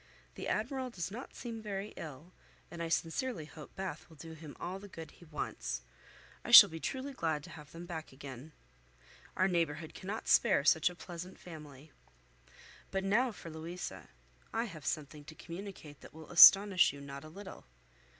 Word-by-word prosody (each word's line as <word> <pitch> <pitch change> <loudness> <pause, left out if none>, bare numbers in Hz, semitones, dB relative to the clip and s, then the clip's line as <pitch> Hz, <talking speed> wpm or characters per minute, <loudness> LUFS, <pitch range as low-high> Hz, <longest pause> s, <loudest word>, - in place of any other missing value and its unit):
The - - -6
Admiral 255 +4 -1
does 185 -6 -5
not 240 +6 -8
seem 230 -2 -6
very 205 -1 -4
ill, 155 +3 -9 0.4
and 170 -1 -7
I 165 - -2
sincerely 170 - -1
hope 155 -1 -12
Bath 190 -5 -6
will 160 - -15
do 160 +2 -10
him 155 -2 -11
all 185 +2 -4
the 205 - -11
good 165 -4 -9
he 175 - -17
wants. 100 - -4 0.6
I - - -7
shall - - +12
be 165 - -7
truly 270 - -4
glad 160 - -1
to - - -11
have 150 -2 -12
them 170 +1 -9
back 160 -3 -6
again. 135 +2 -10 0.9
Our 185 - +4
neighbourhood 165 -3 -1
cannot 200 +4 -6
spare 195 -11 +4
such 160 +2 +5
a 180 - -10
pleasant 180 +1 -8
family. 150 -3 -12 1.0
But 190 0 -2
now 235 +6 +2
for 170 -5 -10
Louisa. 165 +3 -7 0.4
I 230 - 0
have 165 -10 -8
something 150 0 -3
to 155 - -11
communicate 170 -5 -9
that - - -14
will 160 -1 -11
astonish 195 +2 +9
you 140 - -11
not 140 0 -8
a 155 - -10
little. 195 +4 -10
170 Hz, 180 wpm, -33 LUFS, 155-195 Hz, 1.0 s, shall